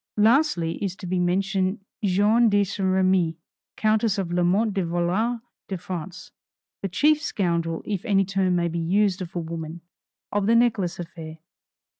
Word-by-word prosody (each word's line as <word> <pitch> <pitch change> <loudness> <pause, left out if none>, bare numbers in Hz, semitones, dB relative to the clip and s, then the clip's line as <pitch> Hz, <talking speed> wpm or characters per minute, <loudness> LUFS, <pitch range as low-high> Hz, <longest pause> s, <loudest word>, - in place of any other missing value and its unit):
Lastly 210 - +2
is 190 -2 -2
to 190 - -10
be 180 +1 -1
mentioned 190 +2 0 0.2
Jeanne 210 +4 +4
de 205 0 +3
St. 195 0 -2
Remi, 185 -3 +2 0.4
Countess 215 -1 +2
de 195 - -1
Lamotte 180 +5 +1
de 195 -1 0
Valois 175 +8 0 0.3
de 190 - -3
France, 180 0 -7 0.5
the 195 - -2
chief 300 - +3
scoundrel, 170 - -1
if 200 -4 -2
the 200 -4 +2
term 190 -1 +1
may 170 -1 +1
be 170 0 -3
used 190 +3 +1
of 180 0 -7
a - - 0
woman 165 0 -6 0.5
of 205 -1 0
the 230 - +4
necklace 225 -7 +2
affair. 165 -2 -8
190 Hz, 160 wpm, -24 LUFS, 175-205 Hz, 0.5 s, Jeanne